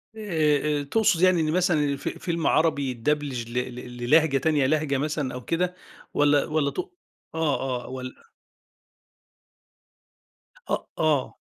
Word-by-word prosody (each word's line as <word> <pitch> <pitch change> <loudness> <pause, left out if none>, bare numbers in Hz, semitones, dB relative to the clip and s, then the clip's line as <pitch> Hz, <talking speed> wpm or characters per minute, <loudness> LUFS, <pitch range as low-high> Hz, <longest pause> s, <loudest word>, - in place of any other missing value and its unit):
آآ، 150 -8 +1
آآ، - - -5
تقصد 175 +2 +2
يعني 185 -2 +5
إن 155 -1 0
مثلًا 175 -2 +2
الف 140 -1 -2
فيلم 170 -2 -2
عربي 150 -4 +2
يدبلچ 135 -1 -1
ل - - -9
ل 125 0 -2 0.2
للهجة 140 +4 +3
تانية 145 0 +2
لهجة 150 0 +1
مثلًا 150 -2 -2
أو 125 -1 -7
كده 180 +2 -1 0.4
والّا 145 -1 +3
والّا 150 -2 0
تق 370 +1 -5 0.4
آه، 135 -6 -1
آه - - -9
والّا 130 - -8 2.4
أ - - +2 0.2
آه. 155 -4 +1
150 Hz, 135 wpm, -25 LUFS, 135-160 Hz, 2.4 s, يعني